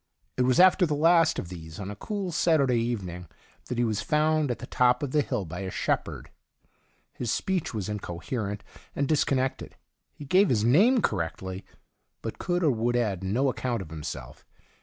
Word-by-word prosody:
It 125 - +2
was 125 -1 +3
after 185 -1 +6
the 150 - 0
last 165 +1 +4
of 85 - -4
these^ 80 0 -9
on 100 0 -5
a - - -7
cool 195 - -4
Saturday 140 -7 +3
evening, 95 -7 -3 0.4
that 125 - -4
he 120 - +2
was 110 -3 0
found 155 -1 +1
at 120 - -1
the - - -8
top 125 +1 +2
of 140 - -2
the 150 - +3
hill 100 -8 -2
by 85 +2 -7
a 95 -1 -4
shepherd. - - -2 0.8
His 120 -3 -3
speech 190 -4 -1
was 105 -4 -4
incoherent 105 +1 -4 0.3
and 140 - 0
discon 145 -2 +2
nected; 130 +1 -2 0.4
he 145 - -11
gave 185 +7 +4
his 110 -4 +2
name 200 - +4
correctly, 95 0 -2 0.6
but - - -5
could 175 0 -1
or 150 - +4
would 120 0 0
add 105 -6 0
no 115 +9 +1
account 125 -4 -2
of 80 - -13
himself. 75 -5 -7
120 Hz, 185 wpm, -27 LUFS, 100-150 Hz, 0.8 s, after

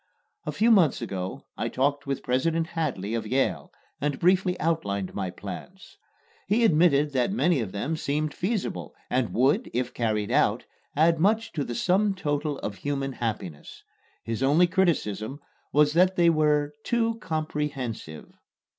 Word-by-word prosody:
A - - 0
few 230 +2 +3
months 180 -10 +5
ago 95 -5 -5
I - - -2
talked 145 +2 0
with 135 -1 -2
President 160 +6 +1
Hadley 135 - -2
of 115 - -2
Yale, 135 +1 0 0.3
and 145 -1 0
briefly 180 +1 +2
outlined 100 - -1
my 95 -2 -2
plans. 140 - -9 0.5
He 230 +3 +3
admitted 150 -5 +4
that 130 +5 +1
many 175 - +2
of 110 -6 -3
them 135 +11 -2
seemed 150 0 -1
feasible 185 - -3 0.2
and 125 -3 +1
would, 140 - +2
if 125 0 -1
carried 105 -3 -1
out, - - +2 0.3
add 165 +2 +4
much 220 +5 +2
to 145 - -2
the 120 - -5
sum 195 - +2
total 145 -4 -2
of 100 -1 -4
human 135 -1 -2
happiness. 110 -11 -5 0.4
His 115 +1 -3
only 145 +6 +5
criticism 145 - 0 0.3
was 150 0 +4
that 185 +3 +4
they 170 -2 +5
were 150 -2 +2
"too 230 -1 0
comprehensive." 150 - -4
145 Hz, 150 wpm, -26 LUFS, 120-175 Hz, 0.5 s, months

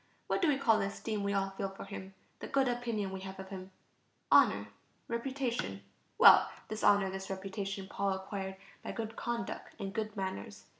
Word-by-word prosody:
What - - 0
do 345 - +4
we 290 -3 +4
call 225 -5 +4
the 195 - +1
esteem 210 +1 -3
we 200 0 0
all 195 -1 +1
feel 195 0 -3
for 195 - -9
him, 190 -1 -8 0.2
the - - -6
good 275 -1 +2
opinion 235 -5 -1
we 190 - -4
have 190 0 -7
of 190 0 -7
him? 190 -1 -7 0.6
Honor... - - +6 0.4
reputation. 235 - -2 0.3
Well, - - +9 0.2
this 215 0 -4
honor, 200 -2 +5
this 190 0 -5
reputation, 195 0 -4
Paul 200 0 0
acquired 190 0 -4 0.3
by - - -5
good 225 -1 -4
conduct 235 -1 -4
and 195 -1 -4
good 215 -1 -3
manners. 100 - -4
200 Hz, 185 wpm, -33 LUFS, 190-225 Hz, 0.6 s, Well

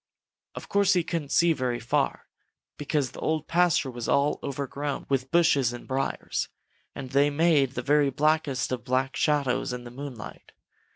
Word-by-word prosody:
Of - - -8
course 200 -1 +3
he 180 -2 +2
couldn't 165 -4 -4
see 170 -1 +4
very 125 -4 -2
far, 115 - -1 0.5
because 145 -3 -1
the - - -11
Old 155 -1 -1
Pasture 170 -6 +2
was 120 -1 -5
all 140 +1 +2
overgrown 140 +1 -4
with 135 -1 0
bushes 140 -7 +3
and 120 - -9
briars, 135 0 -2 0.5
and 130 -2 -7
they 140 +2 +4
made 145 -3 +2
the 125 - -3
very 145 +1 +3
blackest 150 -2 0
of 125 -3 -3
black 130 +2 0
shadows 140 -5 +1
in 125 0 -6
the 120 - -10
moonlight. 130 -4 -9
140 Hz, 165 wpm, -26 LUFS, 130-155 Hz, 0.5 s, see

